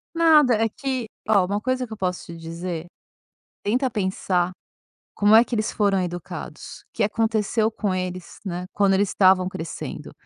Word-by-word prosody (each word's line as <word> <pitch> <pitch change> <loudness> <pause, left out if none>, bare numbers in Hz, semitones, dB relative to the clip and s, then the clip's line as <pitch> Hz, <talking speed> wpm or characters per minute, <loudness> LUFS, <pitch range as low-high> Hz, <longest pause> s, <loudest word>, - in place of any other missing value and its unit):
Nada, 310 -7 +6
é 225 +1 +2
que 260 +2 -3 0.2
oh, 200 -4 +5
uma 200 +3 -2
coisa 255 +2 -1
que 225 - -9
eu - - -8
posso 180 -2 -2
te 170 - -9
dizer, 165 +1 -5 0.8
tenta 250 +6 +1
pensar 185 -4 0 0.6
como 205 +1 +4
é 225 +2 +8
que 245 - -4
eles 215 0 0
foram 200 -2 +2
educados, 175 -1 -7
o - - -86
que - - -1
aconteceu 220 +1 +1
com 205 -3 -2
eles, 185 -1 -5
né, 180 -2 -4
quando 200 -1 +3
eles 200 +1 +2
estavam 185 -1 +4
crescendo. 170 -4 -6
200 Hz, 170 wpm, -23 LUFS, 185-225 Hz, 0.8 s, é